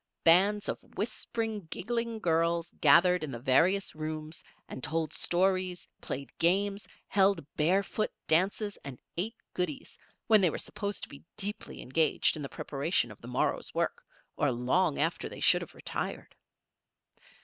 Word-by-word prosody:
Bands 195 +5 +5
of - - -2 0.2
whispering, 220 0 -3
giggling 230 +4 -2
girls 170 -2 +1
gathered 180 0 +6
in 155 - -3
the 120 - -4
various 170 +11 +2
rooms 155 0 -5 0.2
and 130 - -8
told 160 -1 -1
stories, 185 0 0
played 140 - -5
games, 200 +4 +2 0.2
held 195 -5 +3
bare 180 +6 +3
foot 215 +2 -2
dances, 200 +5 +1
and 135 -3 -7 0.2
ate 215 +7 -2 0.2
goodies, 180 -6 -4 0.3
when 215 -2 +6
they 180 - +4
were - - -3
supposed 200 0 -4
to - - -6
be 140 - -12
deeply 210 +1 -4
engaged 155 +5 +2
in 155 - -5
the 140 - -5
preparation 140 -4 -1
of 105 - -14
the 115 - -10
morrow's 125 - -1
work, - - -1 0.3
or 145 - +2
long 135 +7 +1
after 165 +3 0
they - - -9
should - - +5
have - - -9
retired. - - -5
175 Hz, 150 wpm, -30 LUFS, 155-200 Hz, 0.3 s, gathered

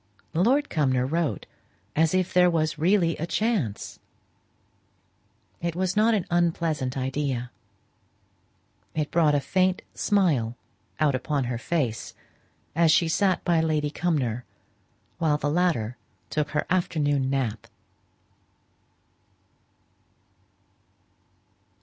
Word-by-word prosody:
Lord 255 - +3
Cumnor 130 -5 +1
wrote 160 +2 -1 0.5
as 160 +3 +3
if 185 -1 0
there 180 0 +5
was 155 -2 0
really 170 0 +3
a 165 - -3
chance. 195 - -1 1.6
It 170 -1 -2
was 185 0 -1
not 220 +2 +4
an 195 - -1
unpleasant 165 -6 0
idea; 130 -2 -2 1.4
it 150 -2 -1
brought 155 -3 +3
a - - +3
faint 185 +5 +1
smile 155 - +1 0.4
out 150 -3 +3
upon 140 +2 -1
her 120 -1 -3
face, 130 -7 -2 0.6
as 165 -1 +4
she 165 +1 +4
sat 185 +3 +1
by 170 -2 +3
Lady 155 -2 0
Cumnor, 135 -9 -1 0.8
while 155 -3 +2
the 145 0 -1
latter 150 -10 0 0.3
took 150 -1 -1
her 150 - -1
afternoon 145 -6 +1
nap. 120 -6 -2
155 Hz, 105 wpm, -26 LUFS, 135-175 Hz, 1.6 s, there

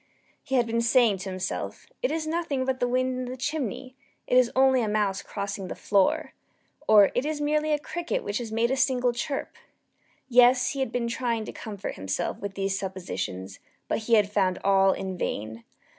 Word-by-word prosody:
He 265 - -3
had 245 -2 +4
been 230 0 0
saying 235 -4 +4
to 190 - -5
himself 185 0 -4 0.2
"It - - 0
is 320 0 -2
nothing 310 -5 -1
but 260 0 -1
the 245 - +1
wind 255 +1 0
in 255 - -3
the 250 +1 -6
chimney 260 -2 -3 0.3
it - - 0
is 250 -2 +5
only 265 -1 +4
a 225 - 0
mouse 210 -2 0
crossing 200 -1 -5
the - - -5
floor," 200 -2 +1 0.5
or 205 -2 +7
"It 245 - 0
is 300 0 -2
merely 305 +1 +1
a 300 - +3
cricket 340 +3 -3
which 205 +2 -2
has 230 -3 -6
made 230 +2 +1
a - - +2
single 250 -2 +2
chirp." 275 +3 -4 0.7
Yes, 250 0 +5
he 275 - -5
had 265 - -1
been 240 -1 -1
trying 235 -2 -1
to - - -6
comfort 205 -3 -6
himself 95 0 -3
with 200 -1 -6
these 195 0 -1
suppositions: 135 - -5 0.3
but - - 0
he 230 +1 +2
had 205 -2 +3
found 190 -3 +1
all 195 0 +4
in 190 -1 -4
vain. 110 +2 -4
235 Hz, 200 wpm, -26 LUFS, 195-260 Hz, 0.7 s, or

